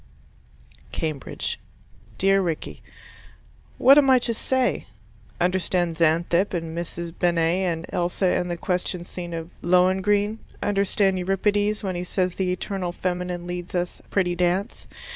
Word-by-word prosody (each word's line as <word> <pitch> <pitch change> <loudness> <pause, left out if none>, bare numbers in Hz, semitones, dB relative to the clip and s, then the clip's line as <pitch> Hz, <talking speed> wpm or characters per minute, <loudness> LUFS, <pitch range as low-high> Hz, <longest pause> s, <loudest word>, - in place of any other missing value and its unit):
Cambridge 155 -4 -3 0.6
Dear 195 +1 +4
Rickie: 165 -4 -3 1.0
What 275 +3 +8
am 275 -2 +3
I 260 - +7
to 240 -1 0
say? 255 - 0 0.5
"Understand 175 -1 +1
Xanthippe, 170 +4 +2
and 165 -1 -4
Mrs. 170 0 -5
Bennet, 175 +1 +2
and 165 0 -4
Elsa 180 +1 0
in 180 - 0
the 175 -1 -3
question 180 0 -2
scene 175 -1 -6
of 165 +1 -6
Lohengrin"? 190 +4 +2 0.2
"Understand 200 -1 +2
Euripides 205 +3 +1
when 190 -2 -1
he 175 0 -3
says 180 0 -1
the 185 -1 -1
eternal 185 0 -3
feminine 180 -1 -3
leads 175 0 -5
us 175 0 -2
a - - -21
pretty 180 -3 +1
dance"? 180 +4 -1
180 Hz, 135 wpm, -24 LUFS, 175-195 Hz, 1.0 s, What